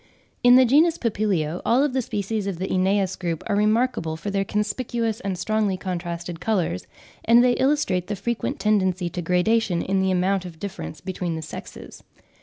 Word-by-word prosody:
In 245 0 +8
the 260 0 +7
genus 310 +7 +4
Papilio, 195 -8 -1
all 260 +5 +3
the 260 -1 -1
species 210 -2 -3
of 195 -4 -3
the 190 +2 -4
Aeneas 190 0 +1
group 170 -3 -3
are 205 - 0
remarkable 210 -6 +1
for 200 +5 -5
their 195 0 +1
conspicuous 220 +2 -2
and 195 -6 -3
strongly 210 0 0
contrasted 175 -2 -5
colours, 180 - -1 0.4
and 235 +1 +6
they 250 -1 +4
illustrate 260 -11 +1
the 210 - -2
frequent 230 +4 -3
tendency 190 -4 +1
to 175 - -4
gradation 180 +1 +1
in 190 0 0
the 190 - +1
amount 185 +1 +1
of 175 -3 -9
difference 190 -6 -7
between 180 -3 -3
the 160 - -5
sexes. - - -9
195 Hz, 175 wpm, -23 LUFS, 180-225 Hz, 0.4 s, In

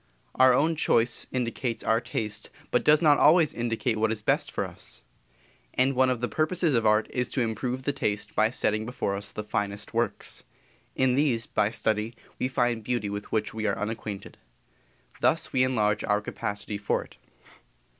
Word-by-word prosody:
Our 130 0 +6
own 155 +6 +3
choice 120 -6 +1
indicates 120 -1 -2
our 115 +1 +2
taste 110 -3 -4 0.2
but - - +2
does 150 +2 +5
not 150 -2 +6
always 160 0 +5
indicate 120 0 -1
what 110 0 +2
is 110 -1 -4
best - - +1
for - - -2
us. - - -10 0.7
And 130 +2 +3
one 130 0 +3
of 125 -2 -1
the 125 - 0
purposes 155 +2 +1
of 115 -3 +2
art 105 0 +4
is 125 -1 -1
to 130 - -1
improve 125 +3 -2
the 145 - 0
taste 105 -7 -2
by 110 - +4
setting 110 -3 0
before 110 -4 -2
us 100 +1 -4
the 105 - -5
finest 105 0 -3
works; - - -1 0.5
in 130 -1 +3
these, 130 -4 +1
by 105 -1 +1
study, 110 0 -1 0.2
we - - +1
find 120 -3 0
beauty 115 -3 -2
with 105 0 -6
which 110 -1 -1
we 110 -1 -2
are 100 - 0
unacquainted. 105 -2 -5 0.8
Thus - - +1
we 130 - +4
enlarge 105 -5 +1
our 105 -1 +2
capacity 105 -1 -5
for 100 - 0
it. - - -19
115 Hz, 180 wpm, -27 LUFS, 105-130 Hz, 0.8 s, Our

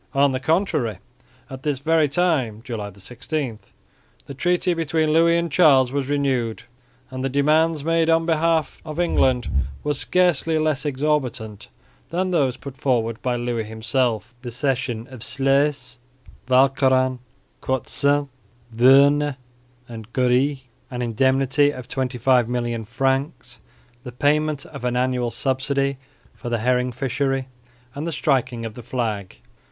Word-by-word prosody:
On 140 0 +4
the 130 - -2
contrary 155 - 0 0.5
at 130 -1 -9
this 145 -1 -1
very 155 +1 +2
time 140 -9 0
(July 110 -5 -5
16) 120 - -5 0.7
the 140 - -8
treaty 175 +5 +1
between 160 -1 0
Louis 170 +1 +4
and 170 -1 -2
Charles 135 -6 +5
was 140 -1 -2
renewed; 130 -6 -1 0.5
and 130 0 -5
the 135 - 0
demands 155 +3 +2
made 165 0 +2
on 165 0 +3
behalf 165 -1 0
of 155 0 -7
England 130 -8 +2 0.4
were 150 - 0
scarcely 160 +4 +1
less 155 -1 0
exorbitant 130 -7 -2 0.4
than 185 +2 -1
those 135 -7 +1
put 135 0 -10
forward 115 -4 0
by 125 -1 -1
Louis 120 -2 -2
himself 110 +1 -1
the 125 - -6
cession 125 -2 -2
of 130 - -9
Sluis, 135 -1 0 0.5
Walcheren, 130 -1 +3 0.4
Cadsand, 140 +2 0 0.5
Voorne 140 +4 +5 0.5
and 115 -1 -10
Goerce, 130 +2 +1 0.3
an 125 0 -4
indemnity 135 +4 +2
of 130 -4 -7
25,000,000 125 -3 0
francs, 135 -1 -2 0.4
the 125 - -7
payment 145 +3 0
of 140 -4 -10
an 125 0 -1
annual 125 -1 0
subsidy 135 +3 -1 0.4
for 120 - -7
the 120 - 0
herring 125 +2 +1
fishery, 135 +1 -2 0.4
and 145 +4 -5
the - - -2
striking 130 -4 0
of 110 - -6
the 120 - -9
flag. 110 - -3
135 Hz, 135 wpm, -22 LUFS, 125-145 Hz, 0.7 s, Charles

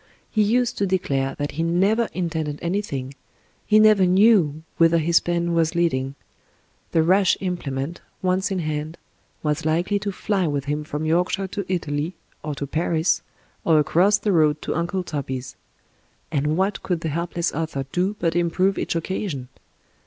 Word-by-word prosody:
He 215 - +2
used 240 +3 +1
to 200 - +1
declare 135 -8 0
that 145 0 -2
he 160 - -3
never 195 +7 +2
intended 160 -4 -2
anything 170 -8 -2 0.3
— - - -35
^he 215 - +7
never 215 -3 +6
knew 180 -6 +4
whither 165 0 +5
his 165 +1 +4
pen 170 0 -1
was 165 0 +1
leading 135 -6 0 0.4
— - - -39
^the 160 -1 +3
rash 190 +2 +4
implement, 165 -4 -3 0.2
once 185 +1 +1
in 195 - -1
hand, 155 -1 -3 0.5
was 150 -1 0
likely 170 +6 +1
to 200 0 -3
fly 195 -2 -1
with 145 -2 -2
him 150 +1 -2
from 150 +1 -4
Yorkshire 180 +4 +1
to 195 -1 -4
Italy— 155 -1 -2 0.3
or 150 -1 -4
to 140 - -4
Paris^ 160 +3 +1 0.4
or 160 -2 +4
across 180 +7 +4
the 210 - -1
road 155 -4 +3
to - - -2
Uncle 175 +3 -1
Toby's; 130 -5 -5 0.8
and 150 +1 0
what 195 +2 0
cotdd 175 -3 -2
the 160 - -2
helpless 170 +2 -2
author 155 -3 -3
do 185 +4 0
but 165 -1 0
improve 180 +3 +1
each - - -2
occasion 165 -6 -3
170 Hz, 165 wpm, -23 LUFS, 150-190 Hz, 0.8 s, ^he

